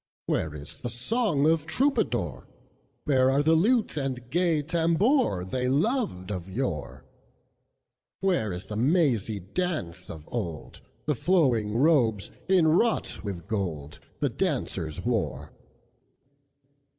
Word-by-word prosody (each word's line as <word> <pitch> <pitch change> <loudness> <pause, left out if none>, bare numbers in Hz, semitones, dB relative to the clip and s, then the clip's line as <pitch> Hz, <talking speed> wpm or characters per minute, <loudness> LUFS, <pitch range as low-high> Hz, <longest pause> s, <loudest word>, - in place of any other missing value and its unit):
Where 75 -1 -1
is 75 0 -8
the 120 - -5
song 150 - +1
of 160 -1 +2
Troubadour? 270 - 0 0.6
Where 130 -3 +3
are 140 +2 +2
the 160 +2 +4
lute 215 +4 +2
and 130 -3 -3
gay 170 -3 +2
tambourThey 165 - +1
loved 145 - 0
of 90 -2 -5
yore? 95 - -4 1.1
Where 180 - +1
is 90 +2 -5
the 105 - -6
mazy 120 - +2
dance 95 - -3
of 80 -1 -9
old, 85 -10 -5 0.2
The 150 - +2
flowing 125 - +2
robes, 120 -8 +3 0.2
inwrought 180 - +2
with 95 -5 -5
gold, 80 -9 -4 0.2
The - - +2
dancers 80 +3 -2
wore? 120 -4 -2
130 Hz, 115 wpm, -27 LUFS, -, 1.1 s, the